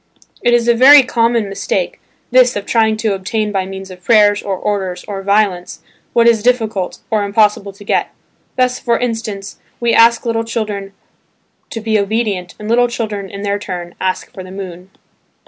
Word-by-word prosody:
It 240 0 +3
is 235 0 +1
a 235 - +5
very 270 +4 +8
common 230 -3 +1
mistake, 195 -2 -3 0.3
this 250 0 +5
of 205 -1 -4
trying 220 -2 +2
to 215 -2 0
obtain 210 +3 -2
by 190 -2 -2
means 190 0 -8
of 180 0 -13
prayers, 210 -1 +4
or 195 -2 -3
orders, 190 -3 -3
or 200 -2 -5
violence, 200 -3 0 0.3
what 235 0 +4
is 230 -2 +4
difficult, 220 -6 -1
or 215 -2 +1
impossible 205 0 +1
to 200 +1 -15
get. - - 0 0.5
Thus, 255 0 +1
for 235 -1 +1
instance, 225 -5 -4 0.2
we 235 -1 +1
ask 230 +1 +5
little 230 -1 0
children 210 -4 -4 0.8
to 225 - -6
be 220 -1 +1
obedient, 200 -3 -2
and 210 - -8
little 240 +2 +3
children 215 -5 -4
in 200 +1 -7
their 205 0 -1
turn 175 -3 -6
ask 185 0 -2
for 185 - -8
the 185 - -11
moon. 185 -1 -8
210 Hz, 180 wpm, -16 LUFS, 195-230 Hz, 0.8 s, very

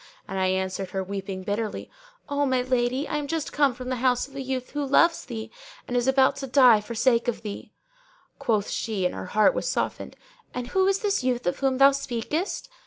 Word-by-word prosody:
and 195 0 -3
I 190 - +2
answered 190 0 -2
her, 190 +1 -2
weeping 190 -1 -5
bitterly, 210 +2 -3 0.4
'O 285 0 0
my 255 -1 +1
lady, 255 +2 0
I 300 - -2
am 295 -1 -3
just 325 0 -3
come 285 -4 +3
from 255 0 -7
the 255 - -1
house 250 +1 +1
of 275 - -18
a 275 - -4
youth 260 -1 -4
who 290 0 -2
loves 330 +5 +3
thee 220 -3 -6 0.4
and - - -5
who - - +4
is 245 - -2
about 265 0 +4
to 270 - -5
die 250 -5 +6
for 230 +3 -7
sake 235 0 +2
of 240 -1 -2
thee!' 205 -2 -7 0.7
Quoth 215 -4 0
she 210 -5 -2
(and 180 - 0
her - - -6
heart 215 - +6
was - - -2
softened), - - -3 0.4
'And 245 -1 -4
who 380 0 +2
is 390 0 +1
this 400 -9 0
youth 250 -1 0
of 175 - -1
whom 270 -1 +1
thou 275 +1 +7
speakest?' 275 - -3
250 Hz, 225 wpm, -25 LUFS, 215-275 Hz, 0.7 s, thou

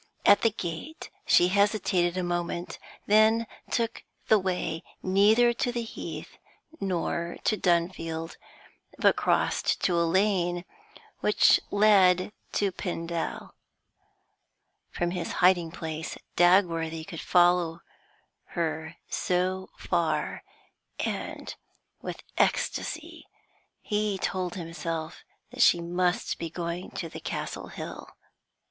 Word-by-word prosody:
At 205 0 +7
the 230 - +4
gate 200 - -6 0.2
she 175 - +5
hesitated 190 -3 +2
a 185 - 0
moment, 175 0 -3 0.3
then 220 +2 +4 0.2
took 230 -2 -1 0.3
the 220 - +6
way 180 -3 -2 0.2
neither 215 +6 +4
to 245 +1 -1
the 240 -1 -2
Heath 225 - -8 0.4
nor 170 -2 -2
to 215 - +2
Dunfield, 170 -3 -1 0.6
but - - +4
crossed - - +1
to 180 - +2
the 170 0 +2
lane 175 -1 +1 0.5
which - - +5
led 200 -3 +4 0.2
to 200 -2 +1
Pendal. 170 -2 -4 1.4
From 175 0 -2
his 175 -2 -3
hiding 175 -2 +4
place 160 -1 -5 0.2
Dagworthy 165 -3 +3
could 165 -3 -7
follow 175 -2 +3 0.8
her 160 -1 -2
so 185 +1 -1
far, - - -1 0.6
and - - -4 0.5
with - - -6 0.2
ecstasy - - -1 0.6
he 210 -1 0
told 185 -1 -2
himself 165 -2 -5 0.3
that - - -4
she 175 - +6
must 175 +1 -1
be 165 - -3
going 170 +2 -4
to - - -4
the - - -9
Castle - - -5
Hill. - - -8
180 Hz, 110 wpm, -28 LUFS, 170-200 Hz, 1.4 s, At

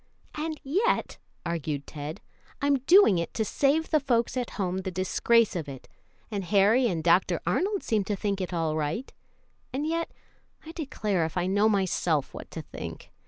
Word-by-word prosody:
"And 310 0 -4
yet," 390 - 0 0.3
argued 155 -4 -3
Ted, 150 +1 -7 0.4
"I'm 280 -1 +2
doing 350 - +7
it 170 - -4
to 220 - 0
save 290 +8 +1
the 310 - +4
folks 240 -4 +1
at 250 -2 -2
home 185 -2 -1
the 190 - -3
disgrace 195 +5 +2
of 160 -5 -3
it, 135 -2 -9 0.4
and 200 -2 -2
Harry 210 +7 +4
and 170 -7 -2
Dr. 175 0 +3
Arnold 380 - 0
seem 215 -4 +1
to 205 - -1
think 200 0 -2
it 185 - -3
all 165 -3 0
right; 155 - -3 0.6
and 275 +4 -2
yet, 330 +1 -1 0.6
I 320 - -7
declare 220 - -1
if 160 +3 -5
I 175 - +1
know 205 +3 +3
myself 180 -7 0
what - - -9
to - - -7
think. - - -8
200 Hz, 175 wpm, -27 LUFS, 175-275 Hz, 0.6 s, doing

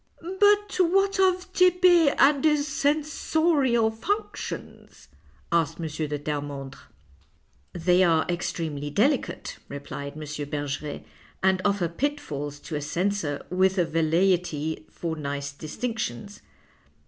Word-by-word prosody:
" 375 +3 -6
But 410 0 +4
what 390 +2 +3
of 370 -1 +2
Tepe 360 -4 +5
and 275 -1 +5
his 300 -2 +3
censorial 295 -4 +1
functions? 405 - -5 0.2
" - - -32
asked 170 -2 +1
M. 165 - -3
de 150 -1 -3
Terremondre. 145 -2 -5 0.6
" 70 -2 -39
They 180 +1 +6
are 165 -3 +3
extremely 160 -4 -3
delicate," 255 - 0
replied 140 0 -6
M. 155 - -9 0.3
Ber 145 -1 -2
geret, 145 +1 -5 0.2
" - - -28
and 190 0 +3
offer 200 -4 +1
pitfalls 165 - -3
to 155 - -6
a 150 - -2
censor 170 -1 -2
with 190 +1 +2
a 175 - +3
velleity 165 -1 0
for 165 -2 -4
nice 140 -1 -4
distinctions. 205 +6 -5
180 Hz, 125 wpm, -26 LUFS, -, 0.6 s, They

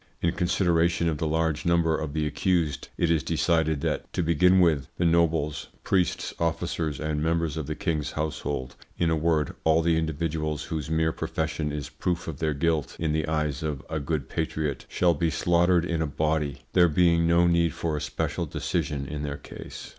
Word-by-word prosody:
In 85 - +1
consideration 85 -1 +2
of 80 -3 -1
the 80 - 0
large 80 -1 0
number 85 -2 +2
of 80 -2 -4
the 80 -1 0
accused, 75 -1 0
it 85 -1 +2
is 80 -2 +3
decided 80 -2 +1
that, - - -2
to 90 - 0
begin 90 +3 +4
with, 80 -6 +3
the 85 - +1
nobles, 80 -3 +1 0.2
priests, 95 -2 0
officers, 80 -2 -1
and 75 -1 -2
members 80 -1 0
of 80 -3 -4
the 75 - -3
king's 80 -6 -2
household 75 -4 -3 0.2
in 85 -2 +1
a - - +3
word, 80 -2 +1
all 80 +1 +4
the 85 -1 +3
individuals 80 -1 -2
whose 80 -3 -4
mere 80 0 +2
profession 80 -1 -2
is 75 -1 -4
proof 90 -2 -3
of 80 -4 -5
their 75 -2 0
guilt 75 -2 0
in 80 -2 0
the 80 0 0
eyes 75 -2 -1
of 75 -3 -3
a 80 - -1
good 75 -2 -2
patriot 80 -4 -3
shall 90 -1 +3
be 85 +2 0
slaughtered 85 +1 +3
in 85 -2 -1
a 80 - 0
body, 75 0 -1
there 90 -2 +5
being 85 +1 +3
no 85 +1 +4
need 85 -1 +3
for 80 +1 -2
a 75 - -3
special - - -2
decision 70 -2 -2
in 75 +2 -5
their 70 -1 -3
case. - - -9
80 Hz, 190 wpm, -26 LUFS, 75-85 Hz, 0.2 s, there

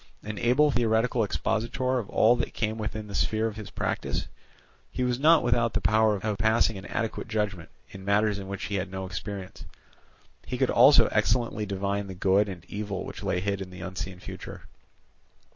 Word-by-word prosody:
An 105 -1 -5
able 140 +5 +4
theoretical 115 0 +2
expositor 120 +5 -1
of 105 - -6
all 115 +3 +4
that - - -3
came 110 0 -2
within 110 0 -4
the 100 - -9
sphere 110 +2 +1
of 110 -2 -2
his 110 -2 -8
practice, - - -2 0.6
he 125 - -2
was 125 0 0
not 160 +3 +5
without 115 -2 +2
the - - +3
power 110 0 +3
of 105 +1 -2
passing 110 +1 +3
an 95 +1 -8
adequate 115 +1 -3
judgment 105 -6 -2 0.2
in 95 - -10
matters 100 +1 +2
in 95 - -7
which 100 0 -5
he 105 - -3
had 95 0 -3
no 95 0 -5
experience. 95 +1 -6 0.8
He - - -3
could - - +2
also - - +7
excellently 115 -4 +1
divine 100 +1 -2
the 95 - -7
good 100 +3 +2
and 90 -3 -8
evil 100 -2 -4
which - - -8
lay 90 - -1
hid 100 0 -2
in 95 - -6
the 90 0 -10
unseen 95 0 -6
future. - - -9
105 Hz, 190 wpm, -27 LUFS, 95-115 Hz, 0.8 s, also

